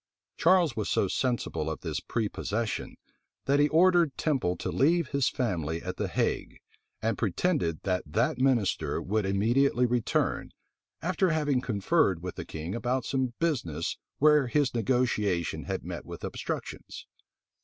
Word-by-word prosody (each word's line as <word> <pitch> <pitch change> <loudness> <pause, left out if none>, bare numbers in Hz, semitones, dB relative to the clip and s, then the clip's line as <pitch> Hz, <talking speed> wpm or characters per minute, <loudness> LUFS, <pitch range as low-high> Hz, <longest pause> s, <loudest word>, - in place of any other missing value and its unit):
Charles 170 -6 +4
was 110 - -2
so 100 - +2
sensible 95 - -1
of 80 - -5
this - - -3
prepossession, 110 0 -3 0.5
that 140 +1 +3
he 145 - +5
ordered 170 -2 +4
Temple 130 - 0
to - - -3
leave 165 +2 +2
his 140 -3 +1
family 85 - -2
at - - -5
the - - -1
Hague, - - -1 0.5
and 115 +1 0
pretended 110 - 0
that 90 -2 0
that 110 +11 0
minister 125 -7 +1
would 105 +1 -1
immediately 120 +6 +2
return, 120 -2 0 0.5
after 185 +2 +1
having 145 -5 +1
conferred 100 - +1
with 90 - -4
the - - -7
king 80 +3 -5
about 125 +2 -1
some 130 -3 -1
business 85 - -1 0.2
where 150 -2 +5
his 140 +1 +1
negotiation 105 -7 0
had - - -4
met - - -5
with - - -9
obstructions. - - -5
120 Hz, 145 wpm, -28 LUFS, 100-145 Hz, 0.5 s, he